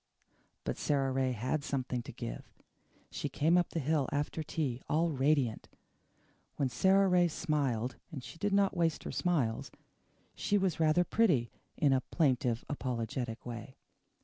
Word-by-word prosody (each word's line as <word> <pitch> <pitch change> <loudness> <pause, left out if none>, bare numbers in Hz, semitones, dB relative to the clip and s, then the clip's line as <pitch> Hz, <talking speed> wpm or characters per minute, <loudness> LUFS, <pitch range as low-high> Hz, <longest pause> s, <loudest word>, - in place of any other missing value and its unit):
But - - -3
Sara 135 -2 +1
Ray 130 0 +1
HAD 130 +6 -1
something 130 -3 -2
to - - -9
give. - - -6 0.7
She - - -3
came 160 +4 +2
up 175 -1 +3
the 165 - -2
hill 145 -2 +1
after 145 +2 -1
tea, 145 -5 -2
all 165 +2 +2
radiant. 135 -4 +1 0.9
When 135 -3 0
Sara 190 +9 +4
Ray 180 -1 +4
smiled 140 -8 -1
and 135 -6 -6
she 165 - -10
did 205 0 0
not 200 -1 +3
waste 165 -2 +1
her - - -5
smiles 145 -11 0 0.6
she 205 - +1
was 190 -5 0
rather 160 +2 +4
pretty 175 - +2 0.3
in 140 -2 +4
a 130 - +2
plaintive, 125 -4 +1
apologetic 120 -3 -3
way. 120 +1 -7
145 Hz, 150 wpm, -32 LUFS, 125-165 Hz, 0.9 s, Sara